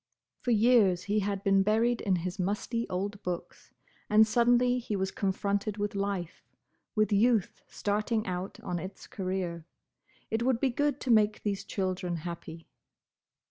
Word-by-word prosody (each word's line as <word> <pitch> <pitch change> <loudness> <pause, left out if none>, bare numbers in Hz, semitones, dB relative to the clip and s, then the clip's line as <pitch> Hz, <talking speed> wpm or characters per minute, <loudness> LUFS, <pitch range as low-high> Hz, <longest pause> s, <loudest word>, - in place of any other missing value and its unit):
For - - -4
years 215 -6 +4
he 205 +2 +1
had 200 -1 -2
been 195 0 +4
buried 225 +4 +2
in 195 -3 +2
his 180 +2 -4
musty 210 +5 -2
old 200 +3 -3
books, 180 -2 -6 0.4
and 215 +1 +7
suddenly 245 +2 +3
he 225 -3 -3
was 190 -1 -1
confronted 200 +1 -1
with 205 0 -2
life, 195 -4 -3 0.5
with 215 0 +2
youth 220 -1 +2
starting 215 +2 -1
out 180 +1 -4
on 175 -1 -3
its 190 +3 -8
career. 185 -4 -4 0.6
It 225 +1 0
would 245 -1 +2
be 265 0 +2
good 290 +2 0
to 255 - 0
make 215 -1 +3
these 200 -2 -2
children 185 -2 -2
happy. 165 -1 -7
205 Hz, 150 wpm, -29 LUFS, 185-225 Hz, 0.6 s, and